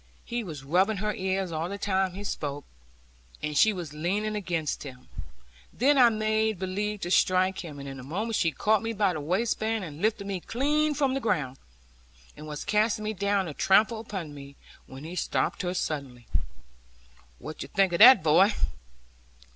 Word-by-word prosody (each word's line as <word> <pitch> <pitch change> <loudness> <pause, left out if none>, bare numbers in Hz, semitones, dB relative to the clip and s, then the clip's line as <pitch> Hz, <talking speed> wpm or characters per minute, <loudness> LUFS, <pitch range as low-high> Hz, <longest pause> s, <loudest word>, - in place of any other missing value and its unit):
He 240 0 -3
was 155 -8 -8
rubbing 185 +9 +2
her 210 +2 -1
ears 190 -1 -2
all 160 +2 -3
the 200 - -5
time 190 -2 0
he 200 - -6
spoke, 145 -7 -4 0.8
and 150 0 -2
she 220 +9 +5
was 175 -7 -6
leaning 200 +7 -1
against 170 -7 -2
him. 130 -3 -10 0.6
Then 280 +5 +3
I 245 -2 +8
made 220 -1 0
believe 205 +3 -3
to 175 - -3
strike 185 0 +3
him, 155 -5 -7
and 140 0 -8
in 135 -1 -7
a - - -9
moment 210 - -3
she 165 - +2
caught 215 +8 +1
me 225 0 -3
by 200 -3 +1
the 155 - -4
waistband, 220 +5 -1
and 155 -1 -9
lifted 210 -2 0
me 195 -2 -3
clean 295 - 0
from 275 -3 +1
the 270 - 0
ground, 140 - -1 0.8
and 155 +1 -10
was 150 -1 -6
casting 215 +1 +1
me 215 - -1
down 200 -1 0
to 155 - -6
trample 215 +8 +3
upon 190 -9 -6
me, 140 -1 -11 0.3
when 135 +2 -10
he 165 +3 -7
stopped - - -1
her 180 0 -2
suddenly. 135 -8 -4 1.1
'What - - -9
think 195 -2 +1
you - - 0
of - - -13
that, 235 -3 +9
boy? 180 +7 +5
190 Hz, 185 wpm, -27 LUFS, 155-215 Hz, 1.1 s, that